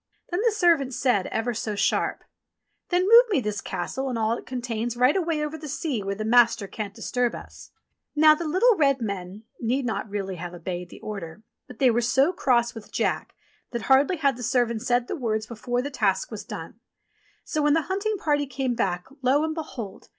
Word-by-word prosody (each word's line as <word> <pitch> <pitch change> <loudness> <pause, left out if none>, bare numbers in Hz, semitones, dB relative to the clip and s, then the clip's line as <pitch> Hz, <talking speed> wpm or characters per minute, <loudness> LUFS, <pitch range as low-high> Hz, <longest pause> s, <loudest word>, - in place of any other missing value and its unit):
Then 350 +3 0
the 470 - +4
servant 335 - +2
said 250 -7 +1
ever 230 +2 -1
so 215 -1 -3
sharp, - - 0 0.7
"Then 355 0 +2
move 470 +3 +9
me 390 - +2
this 210 -4 -3
Castle 230 +9 -3
and 245 - -2
all 220 0 +1
it - - -10
contains 240 -2 -3
right 250 +4 +4
away 330 -5 0
over 310 +1 -6
the 310 - -7
sea 285 -4 -2
where 200 0 -3
the 215 +1 -4
master 235 -2 +4
can't 205 +1 -6
disturb 245 -1 -1
us." - - -11 0.5
Now 310 +1 +7
the 320 +1 -3
little 420 +9 +4
red 275 -5 +3
men 200 -2 -5 0.2
need 250 +3 0
not 225 -2 -3
really 195 -2 -4
have 175 +1 -6
obeyed 175 0 -5
the - - -13
order, 200 -1 -7 0.2
but - - -12
they 255 -1 +4
were 235 +1 +1
so 265 +8 +3
cross 240 -8 +2
with 225 -2 -11
Jack - - -1 0.3
that 235 -2 -4
hardly 275 +6 +4
had 275 -5 +1
the - - -8
servant 235 -2 +1
said 245 +1 +1
the - - -3
words 220 -7 -1
before 245 +2 -3
the 285 - -4
task - - 0
was - - -6
done; - - -8 0.6
so 310 - -2
when 295 0 +4
the 325 0 +2
hunting 400 +5 -1
party 290 -5 0
came 260 -1 -2
back, 180 -6 -1 0.2
lo, 265 +4 +3
and 315 0 -1
behold 250 - -7
245 Hz, 205 wpm, -25 LUFS, 220-295 Hz, 0.7 s, move